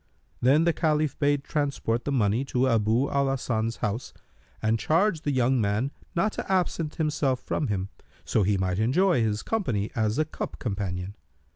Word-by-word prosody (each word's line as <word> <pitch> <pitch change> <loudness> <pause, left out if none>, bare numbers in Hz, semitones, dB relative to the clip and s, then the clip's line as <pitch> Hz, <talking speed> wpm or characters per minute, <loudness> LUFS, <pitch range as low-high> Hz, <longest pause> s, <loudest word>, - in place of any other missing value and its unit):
Then 140 +6 +5
the 170 0 +3
Caliph 155 -3 0
bade 145 -1 +2
transport 140 -6 -1
the 145 - -1
money 115 -1 +2
to 130 -1 +1
Abu 115 +2 +2
al 140 -1 +2
Hasan's 115 -4 -1
house 105 +5 -4 0.4
and 110 +1 +1
charged 165 - +1
the 145 - +1
young 130 -1 +2
man 105 +6 0 0.2
not 170 +5 +2
to - - -5
absent 170 -4 0
himself 150 -5 0
from 150 - -2
him, 100 -3 -2 0.4
so - - +1
he 100 +1 +2
might 95 0 -1
enjoy 160 - +3
his 105 -1 0
company 125 - -1
as 110 -1 0
a 155 - +2
cup 155 - -6
companion. 95 -3 -3
130 Hz, 170 wpm, -26 LUFS, 110-150 Hz, 0.4 s, Then